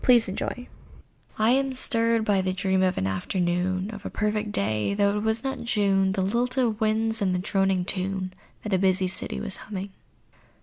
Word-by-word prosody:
AN 250 - +7
AFTERNOON 235 +2 -1 0.7
I 220 +2 +3
am 270 +1 +2
stirred 230 -3 +2
by 200 -3 +3
the 185 0 -1
dream 190 0 +1
of 185 -1 +1
an 95 - 0
afternoon 180 - -1
Of 205 -2 -9
a - - -4
perfect 210 0 -1
day—though 200 - +1
it - - -1
was 220 +1 -1
not 265 -2 -3
June; 195 -4 +2
The 190 -1 0
lilt 240 +6 0
of 230 -4 +1
winds, 220 0 +1
and 185 -2 +1
the - - 0
droning 195 -1 +1
tune 185 0 -2 0.3
That 210 - -3
a 190 - +3
busy 190 0 +2
city 185 +1 -2
was 200 -3 -5
humming. 195 -1 -6
200 Hz, 185 wpm, -26 LUFS, 185-220 Hz, 0.7 s, AN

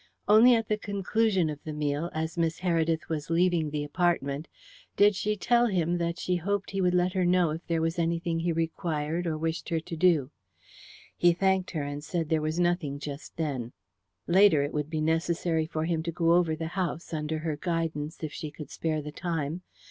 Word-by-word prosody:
Only 225 +4 +7
at 225 -1 -1
the 215 0 0
conclusion 200 -2 +1
of 150 -1 -6
the 155 - -5
meal, 150 +2 -1
as 160 +1 -3
Miss 165 -1 -1
Heredith 165 -3 +1
was 155 -2 -3
leaving 170 -2 +2
the 150 0 -2
apartment, 145 -2 0 0.5
did 205 +1 +6
she 210 +2 -1
tell 240 +4 +3
him 175 -4 0
that 170 0 -1
she 180 -1 0
hoped 200 +3 -2
he 195 -1 -1
would 180 -1 +2
let 180 +1 +2
her 185 -2 +1
know 175 -2 +3
if 160 +3 -6
there 165 -1 0
was 165 +2 -1
anything 170 0 0
he 170 +1 0
required 165 0 -2
or 155 -2 -1
wished 165 +2 -3
her 165 -2 +1
to 165 - -7
do. 160 -5 +3 0.8
He 175 0 +4
thanked 190 +1 +1
her, 155 -5 -3
and 145 +1 -5
said 165 -1 -2
there 160 -1 +2
was 155 +2 -1
nothing 175 -5 0
just 145 0 -8
then. 135 -7 -3 0.5
Later, 175 -5 +5
it 145 - -4
would 150 0 -2
be 155 -1 -2
necessary 165 0 0
for 160 -1 -2
him 165 -1 0
to 170 +1 -3
go 165 0 +2
over 170 -2 +3
the 160 0 -4
house, 175 -3 -3
under 155 0 -2
her 155 -1 -2
guidance, 165 -1 -3
if 155 - -4
she 155 - -5
could 145 -1 -10
spare 155 -2 -2
the 150 - -6
time. 165 0 -3
165 Hz, 205 wpm, -28 LUFS, 155-180 Hz, 0.8 s, Only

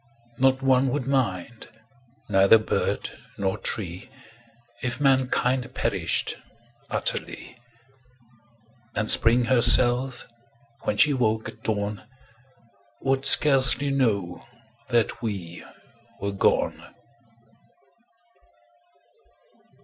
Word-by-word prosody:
Not 135 0 +1
one 130 0 +2
would 130 0 -3
mind, 120 -5 -3 0.6
neither 100 +2 +4
bird 110 - -3 0.3
nor 95 -1 -2
tree 95 +2 -4 0.7
If 125 +1 -4
mankind 130 -2 0
perished - - -1 0.5
utterly; 125 - -5 1.4
And 110 0 +1
Spring 120 +2 +3
herself, 120 +1 +4 0.6
when - - -2
she 150 -1 +3
woke 110 -4 -1
at 110 - -15
dawn, 105 -2 -3 1.0
Would 135 0 -1
scarcely 140 -1 +6
know 100 -10 -2 0.5
that 120 -3 -1
we 95 -7 -6 0.6
were 100 +1 -4
gone. 100 - -2
120 Hz, 80 wpm, -24 LUFS, 105-130 Hz, 1.4 s, scarcely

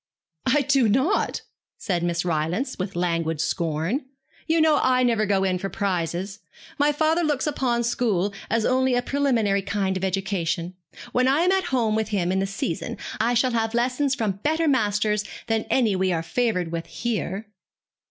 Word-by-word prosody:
'I 290 +3 +4
do 270 -4 +3
not,' 265 - +1 0.3
said 180 -5 -1
Miss 170 0 -1
Rylance, 175 - -1
with 185 0 -4
languid 165 -3 -1
scorn. 165 - -1 0.4
'You 325 0 +3
know 315 -2 +4
I 255 0 +3
never 225 -4 +2
go 195 -1 +2
in 185 -1 0
for 195 - -3
prizes. 190 +1 -2 0.4
My 290 +1 +4
father 315 +3 +2
looks 295 -5 0
upon 255 -5 0
school 210 -5 0 0.2
as 230 -1 +1
only 260 0 +2
a 245 - +1
preliminary 235 -8 +1
kind 195 -1 -1
of 185 - -3
education. 185 -2 -1 0.4
When 250 +1 +2
I 275 +4 +3
am 360 +2 +3
at 380 -1 +1
home 240 -8 +1
with 220 0 0
him 185 -4 0
in 190 - +1
the 195 - 0
season 195 -4 -3 0.2
I 235 +3 +2
shall 250 +2 +2
have 225 -1 -1
lessons 255 +3 +1
from 205 -5 -2
better 315 +4 +1
masters 210 -5 +1 0.2
than 225 -1 0
any 225 -6 +2
we 185 0 +1
are 165 -2 -1
favoured 180 -2 -1
with 165 0 -4
here.' 220 -3 -3
215 Hz, 175 wpm, -24 LUFS, 185-255 Hz, 0.4 s, I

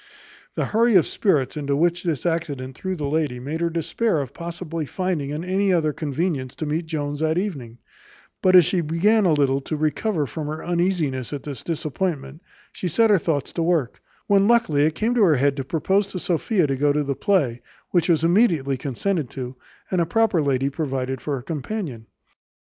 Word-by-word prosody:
The - - 0
hurry 230 0 +3
of 180 - +6
spirits 150 - 0
into 140 -2 -1
which 175 +3 +1
this 165 -6 -2
accident 145 -6 -2
threw 190 +4 -3
the 150 -4 -4
lady 145 -4 -1
made 150 +6 -4
her 170 - +1
despair 170 +4 0
of 135 -2 -5
possibly 165 -2 -5
finding 175 -6 -2
any 185 +6 0
other 160 -4 +2
convenience 145 -3 -2
to 155 - -4
meet 160 +3 -2
Jones 145 -2 -3
that 160 +1 +1
evening; 140 - -4 0.6
but 185 0 +4
as 180 -3 +8
she 180 +2 +1
began 190 +7 +2
a 165 - +4
little 140 -2 +2
to 155 +3 -4
recover 155 +2 0
from 150 +2 -5
her 155 +1 -5
uneasiness 170 - 0
at 140 - -5
the 145 - -5
disappointment, 155 -1 -3 0.3
she 185 - -4
set 220 +6 +3
her 200 - +5
thoughts 150 -4 -2
to 170 - -2
work, 165 -7 0 0.2
when 200 0 +4
luckily 220 -12 +3
it 155 - -2
came 220 +6 0
into 245 -2 +2
her 170 -7 +5
head 140 +1 +2
to 135 - -2
propose 190 +8 +1
to 190 - -6
Sophia 180 +2 +1
to 135 -2 0
go 145 +2 +2
to 150 +1 +1
the 140 -1 -1
play, 135 - +1 0.3
which 175 -1 +2
was 160 -2 +3
immediately 165 - +3
consented 145 +3 -2
to, 130 -1 -6 0.4
and 185 -2 +2
a - - +2
proper 215 -2 +2
lady 140 -1 +1
provided 130 -4 -3
for 145 +2 -2
her 125 - -6
companion. 150 - -5
160 Hz, 195 wpm, -23 LUFS, 140-180 Hz, 0.6 s, as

